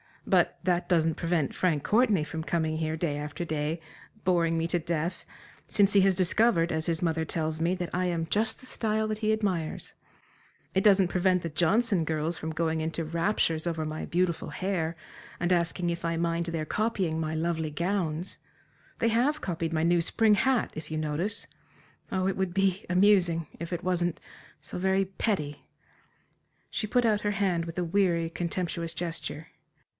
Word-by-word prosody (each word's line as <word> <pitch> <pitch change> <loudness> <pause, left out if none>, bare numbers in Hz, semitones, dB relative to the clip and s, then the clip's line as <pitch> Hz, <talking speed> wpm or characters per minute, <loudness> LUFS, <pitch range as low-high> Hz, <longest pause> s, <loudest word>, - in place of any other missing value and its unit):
But - - +2
that 180 -1 +1
doesn't 165 -3 +3
prevent 165 -5 0
Frank 160 -6 +1
Courtenay 215 -7 +3
from 160 +1 -5
coming 160 -1 0
here 160 0 -1
day 160 -3 -1
after 150 +3 -4
day, 155 0 -2 0.4
boring 170 -3 +2
me 165 - 0
to 175 +1 +1
death, 165 +1 -2 0.4
since 200 -1 +3
he 200 - +6
has 190 -1 +4
discovered 185 -1 +3
as 160 0 0
his 165 -1 -1
mother 160 -2 0
tells 155 -1 -2
me, 175 +3 +2
that 180 -2 -4
I 180 +1 +1
am 170 -2 0
"just 220 +5 0
the - - -14
style 220 -3 -1
that 215 0 -2
he 215 -1 +1
admires" 185 -7 -2 0.8
it 190 - +2
doesn't 195 -3 +5
prevent 185 0 +2
the 165 - -2
Johnston 185 +4 +2
girls 160 +1 -1
from 160 - -4
going 160 0 0
into 160 +1 -2
raptures 165 0 0
over 160 -2 -1
my 155 0 -4
beautiful 175 -1 0
hair, 175 -4 -2 0.4
and 175 +1 0
asking 175 0 +1
if 170 0 -3
I 165 0 0
mind 170 0 0
their 165 -2 -2
copying 190 -4 0
my 160 0 -2
lovely 160 -1 -1
gowns. 170 0 -1 0.6
They 230 - +3
have 255 +7 +2
copied 165 -2 -2
my 160 0 +1
new 170 0 +3
spring 220 +5 +3
hat, 255 +4 +2
if 155 - -7
you 155 - -3
notice. 155 +7 -1 0.7
Oh, 190 0 +1
it 195 - -1
would 190 -2 -1
be 195 -1 +1
amusing, 180 -4 +4
if 170 +1 -5
it 175 - -3
wasn't 175 -2 0 0.4
so - - -7
very 190 +1 +2
petty!" 185 -6 -2 1.0
She 215 - -2
put 245 +2 +2
out 210 -2 +2
her 205 - 0
hand 190 -4 0
with 165 +1 -7
a 180 - +1
weary, 170 -2 +1
contemptuous 170 -1 -3
gesture. 165 -2 -4
170 Hz, 180 wpm, -28 LUFS, 160-190 Hz, 1.0 s, he